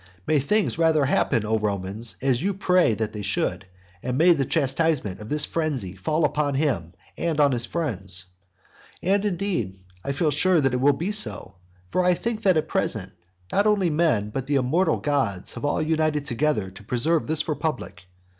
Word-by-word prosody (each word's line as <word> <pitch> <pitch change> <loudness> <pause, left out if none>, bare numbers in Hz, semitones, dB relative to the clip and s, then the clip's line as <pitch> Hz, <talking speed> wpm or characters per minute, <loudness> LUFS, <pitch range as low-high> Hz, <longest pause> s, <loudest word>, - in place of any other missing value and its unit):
May 155 - +2
things 205 +7 0
rather 160 -3 +3
happen, 120 -4 +1
O 110 +1 +1
Romans, 100 +1 -2
as 130 -2 +1
you 195 +2 -1
pray 180 - +3
that 110 0 -3
they 105 - -5
should, 95 -1 -2 0.3
and 125 0 -2
may 175 +3 +6
the 140 -4 0
chastisement 140 - 0
of 105 +1 -9
this 150 0 +3
frenzy 135 - -2
fall 155 - 0
on 145 -1 0
him 125 - -1 0.3
and 165 -3 -1
on 145 -1 +5
his 120 -2 -1
friend. 110 - -3 0.9
And, 195 +3 +2
indeed, 180 - -2 0.3
I 140 - -2
feel 150 +2 +1
sure 175 +4 +3
that 135 -3 +1
it 125 - 0
will 145 +2 +5
be 170 +9 -3
so. 210 0 +1 0.3
For 180 - 0
I 180 0 +3
think 225 +3 -3
that 190 -5 +3
at 155 - 0
present 110 - -1 0.4
not 200 +2 +2
only 200 -5 +2
men 150 -10 +1
but 130 +3 -4
the 145 - +1
immortal 140 +8 +2
gods 130 -11 -1
have - - -5
all 145 - 0
united 155 -2 0
together 120 -7 0
to 95 +3 -14
preserve 145 +9 0
this 155 0 0
republic. 155 - -4
145 Hz, 185 wpm, -24 LUFS, 115-165 Hz, 0.9 s, may